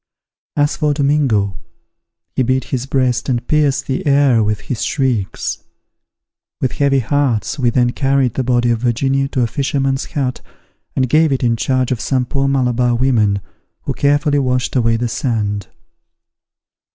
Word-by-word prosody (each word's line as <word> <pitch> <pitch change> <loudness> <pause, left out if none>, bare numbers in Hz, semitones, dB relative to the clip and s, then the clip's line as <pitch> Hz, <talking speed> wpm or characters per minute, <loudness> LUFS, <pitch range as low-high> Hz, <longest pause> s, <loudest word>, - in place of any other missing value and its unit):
As 145 0 +1
for 150 -2 +1
Domingo, 135 - +1 0.8
he - - +1
beat 130 +1 +1
his 130 +1 -4
breast, 130 -2 0
and 120 -2 -1
pierced 140 -3 +1
the 135 - -2
air 140 -4 +4
with 105 0 -1
his 125 - -4
shrieks. 130 -10 -1 1.0
With 130 - 0
heavy 140 -2 +2
hearts 135 0 0
we 125 -2 +2
then 120 0 +2
carried 135 -2 +1
the 130 - -1
body 120 -1 +2
of 115 - 0
Virginia 135 +3 0
to 135 -2 -2
a - - +2
fisherman's 135 +2 -1
hut, 130 -3 -3 0.5
and 130 -1 +1
gave 155 +3 +3
it 135 -1 0
in 120 -1 +2
charge 130 +2 0
of 125 -2 -1
some 130 0 0
poor 135 +2 -1
Malabar 125 -3 +1
women, 110 -6 +2 0.4
who - - -2
carefully 145 0 +2
washed 125 -1 -1
away 115 -2 +2
the 120 +1 -1
sand. 105 -5 -2
130 Hz, 155 wpm, -17 LUFS, 120-140 Hz, 1.0 s, air